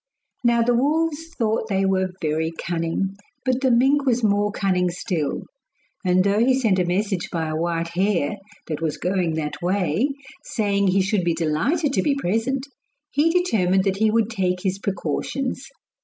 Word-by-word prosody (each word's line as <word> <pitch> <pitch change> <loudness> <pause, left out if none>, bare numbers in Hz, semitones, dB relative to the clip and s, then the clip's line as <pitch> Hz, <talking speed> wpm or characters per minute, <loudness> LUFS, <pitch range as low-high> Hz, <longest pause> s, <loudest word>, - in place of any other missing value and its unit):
Now 235 -1 +4
the 245 +1 +2
wolves 310 +5 +1
thought 220 -2 0
they 195 -1 +1
were 190 -1 +1
very 160 +1 -1
cunning, 175 +3 -2 0.3
but 255 0 +1
the 265 - +3
mink 265 +4 +4
was 245 -3 +1
more 205 0 +2
cunning 185 -3 +1
still; 175 -4 -2 0.6
and 185 0 +3
though 200 +1 +2
he 260 +1 +3
sent 210 -7 +2
a 180 - +2
message 190 +1 -1
by 165 -2 -1
a 155 - -2
white 165 +1 -1
hare, 180 -1 0 0.3
that 155 -1 -4
was 160 -2 -1
going 180 -3 0
that 150 -2 -4
way, 185 - +1 0.4
saying 200 -3 0
he 190 +1 +3
should 195 -1 0
be 170 -1 +1
delighted 175 - 0
to - - +2
be 285 -2 +1
present, 255 +3 -1 0.5
he 295 +4 +3
determined 210 - +2
that 195 -1 0
he 220 +1 +3
would 225 0 +1
take 180 -4 -1
his 190 0 -1
precautions. 200 - -3
195 Hz, 170 wpm, -23 LUFS, 175-240 Hz, 0.6 s, Now